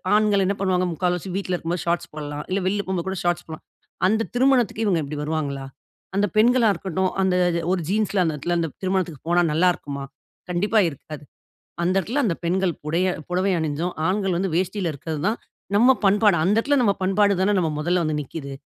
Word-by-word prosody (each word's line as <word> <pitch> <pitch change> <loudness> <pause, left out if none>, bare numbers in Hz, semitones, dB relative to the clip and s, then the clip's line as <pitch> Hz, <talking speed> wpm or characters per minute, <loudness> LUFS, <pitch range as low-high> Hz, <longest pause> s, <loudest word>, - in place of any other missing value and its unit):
ஆண்கள் 210 -2 +3
என்ன 200 - +1
பண்ணுவாங்க? 185 -2 +1
முக்கால்வாசி 180 +2 -1
வீட்ல 185 -2 -3
இருக்கும்போது 170 +1 -3
ஷார்ட்ஸ் 170 0 -1
போடலாம். 150 -1 -5
இல்ல 190 +2 0
வெளியில 200 +2 0
போகும்போது 185 -1 -3
கூட 190 - -3
ஷார்ட்ஸ் 175 0 0
போடலாம். 160 -1 -9 0.4
அந்த 220 +3 +1
திருமணத்துக்கு 245 -4 +2
இவங்க 180 -5 +2
இப்படி 145 +1 -6
வருவாங்களா? 145 -3 -3 0.5
அந்த 205 +1 +2
பெண்களா 235 +1 +5
இருக்கட்டும், 185 +1 -2
அந்த 190 -1 +2 0.2
இது 170 0 -1
ஒரு 180 - -1
ஜீன்ஸ்ல 205 -2 +1
அந்த 160 - 0
இடத்துல 175 +4 -1
அந்த 165 - -1
திருமணத்துக்கு 185 -5 -1
போனா 175 0 +4
நல்லாருக்குமா? 155 -5 0 0.5
கண்டிப்பா 205 +5 +2
இருக்காது. 150 +1 -10 0.6
அந்த 180 +2 +1
இடத்துல 245 - -1
அந்த 170 - +1
பெண்கள் 180 0 +1
புடய 170 +5 +1 0.2
புடவை 185 +2 +1
அணிஞ்சும், 160 +3 -2 0.2
ஆண்கள் 190 -2 0
வந்து 190 0 -1
வேஷ்டியில 185 -2 -1
இருக்கது 150 +1 -5
தான் 225 - -1 0.4
நம்ம 245 +5 +6 0.2
பண்பாடு. 205 -1 +4
அந்த 205 +4 +2
இடத்துல 285 +4 +2
நம்ம 205 -4 +3
பண்பாடு 200 +1 +3
தான 205 +2 +2
நம்ம 160 -3 0
மொதல்ல 175 +2 +1
வந்து 155 -1 -1
நிக்குது. 140 0 -7
180 Hz, 185 wpm, -23 LUFS, 165-200 Hz, 0.6 s, நம்ம